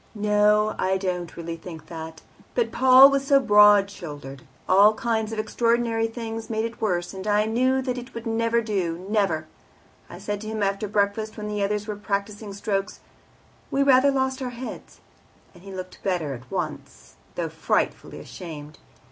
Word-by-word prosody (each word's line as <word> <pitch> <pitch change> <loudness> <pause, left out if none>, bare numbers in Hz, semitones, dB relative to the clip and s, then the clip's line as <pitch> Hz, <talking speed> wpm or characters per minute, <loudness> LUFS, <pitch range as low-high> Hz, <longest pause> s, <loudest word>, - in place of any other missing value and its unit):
"No, 210 0 +3
I 190 +1 +1
don't 180 -3 -4
really 170 0 -5
think 165 -2 -10
that. 160 -1 -9 0.3
But 475 - +1
Paul 260 +2 +8
was 275 0 0
so 275 -1 +6
broad 205 -4 +6
shouldered; 145 -7 -9 0.3
all 205 +3 +6
kinds 225 -3 -1
of 225 - -5
extraordinary 230 +1 +1
things 225 -1 -6
made 220 0 -1
it 230 0 -7
worse, 175 -5 -1
and 190 +1 -7
I 210 0 +3
knew 255 +4 +1
that 250 -1 -2
it 245 0 -12
would 230 +1 -6
never 230 +1 +1
do 185 -5 -2
never. 195 -7 0 0.6
I - - -9
said 205 -1 -4
to 215 - -7
him 215 -1 -2
after 200 +2 -1
breakfast, 210 +2 -1
when 210 -1 -5
the 210 -1 -3
others 205 +1 -1
were 210 - -3
practising 205 +1 -4
strokes, 195 -1 -3 0.7
'We 275 - +1
rather 270 0 +5
lost 265 -1 0
our 255 - -2
heads,' 245 +1 -9 0.5
and 175 - -17
he 195 +1 -11
looked 185 -1 -8
better 175 -7 -1
at 125 0 -11
once, - - -6 0.2
though - - -2
frightfully - - -1
ashamed. 150 -3 -9
210 Hz, 175 wpm, -24 LUFS, 190-230 Hz, 0.7 s, Paul